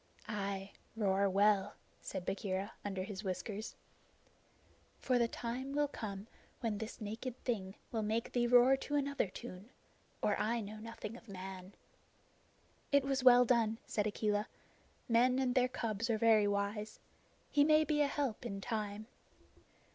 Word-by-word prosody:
"Ay, 200 -2 -3 0.2
roar 200 -2 +2
well," 200 +1 +3 0.3
said 185 -2 -5
Bagheera, 195 +1 -2
under 195 -2 -3
his 195 +1 -6
whiskers, 205 +3 -4 1.2
"for 250 -2 +1
the 235 - +3
time 250 +4 -4
will 290 0 +2
come 205 -7 -6 0.3
when 220 -4 -2
this 220 0 -6
naked 225 +4 -5
thing 195 -5 -2 0.2
will 225 - -1
make 220 +2 -1
thee 240 -1 +2
roar 250 +2 +7
to 290 +2 -3
another 280 -5 +1
tune, 185 +3 -9 0.5
or 205 - +3
I 225 +3 +1
know 215 0 -6
nothing 225 0 -7
of 235 - -17
man." 190 0 -8 1.2
"It 280 -1 +5
was 270 -1 0
well 250 -1 +8
done," 225 -2 +2
said 210 -1 0
Akela. 210 0 0 0.6
"Men 250 +2 +4
and 260 -2 +1
their 250 0 +3
cubs 230 -2 -2
are 225 - +2
very 215 -2 +5
wise. 205 +1 -2 0.5
He 290 - +5
may 310 +1 +5
be 305 -1 +1
a 290 - +4
help 275 -6 -2
in 200 -5 -4
time." 210 0 -3
220 Hz, 150 wpm, -35 LUFS, 200-245 Hz, 1.2 s, well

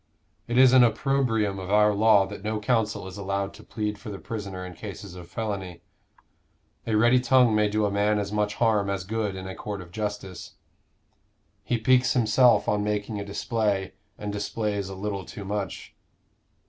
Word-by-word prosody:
It 120 - -1
is 130 -1 +7
an 130 -1 +8
opprobrium 115 -5 +1
of 95 0 -6
our 105 +1 +4
law 105 -1 +5
that 95 - -9
no 110 0 -2
counsel 110 -3 0
is 95 +1 -8
allowed 100 0 -2
to - - -14
plead 105 -2 -4
for - - -8
the 100 - -6
prisoner 100 -4 -6
in 90 - -8
cases 100 +1 -8
of 90 -2 -10
felony. 100 -5 -5 1.0
A 110 - +1
ready 120 +4 +5
tongue 125 -2 +4
may 105 0 +3
do 105 0 +1
a 100 - 0
man 105 +1 +2
as 100 -1 -2
much 105 0 0
harm 105 -4 +2
as 100 -1 -2
good 105 0 -2
in 95 0 -7
a 95 - -5
court 100 +1 -6
of 90 -2 -11
justice. 105 -3 -5 1.1
He 120 - 0
piques 125 +3 +3
himself 120 0 +4
on 105 0 +1
making 105 0 -2
a - - -3
display, 100 -1 -1 0.2
and 105 -1 -5
displays 100 -1 -2
a 95 - -7
little 100 0 -4
too 100 - -9
much." 100 -2 -4
105 Hz, 185 wpm, -26 LUFS, 100-110 Hz, 1.1 s, an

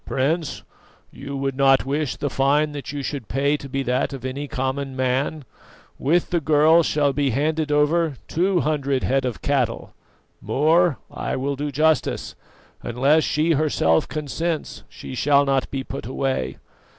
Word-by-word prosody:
Prince, 150 +4 -1 0.5
you 140 0 -7
would 135 -1 -2
not 135 -1 +4
wish 145 0 -1
the 145 - -3
fine 145 +3 +2
that 145 -1 -6
you 145 -1 -4
should 135 -5 -4
pay 140 +4 +1
to 140 -2 -8
be 135 +1 -2
that 125 +2 0
of 130 -2 -7
any 140 +3 -4
common 135 +1 -3
man. 130 +3 -1 0.5
With 165 +6 +1
the 175 - +2
girl 155 +3 +5
shall 145 -3 +1
be 140 0 +1
handed 150 +4 0
over 150 +1 +2
two 180 +1 +1
hundred 140 -3 0
head 135 0 +1
of 125 -4 -4
cattle. 135 -5 -1 0.5
More, 160 +1 +2
I - - -3
will 140 +2 -2
do 145 +2 -3
justice: 155 +3 +1 0.5
unless 140 +6 +2
she 155 +2 +1
herself 140 - +2
consents, 155 +2 -3
she - - -9
shall 140 +3 +3
not 135 -1 0
be 135 -1 -3
put 135 -3 -7
away. 130 - -2
140 Hz, 160 wpm, -22 LUFS, 135-155 Hz, 0.5 s, girl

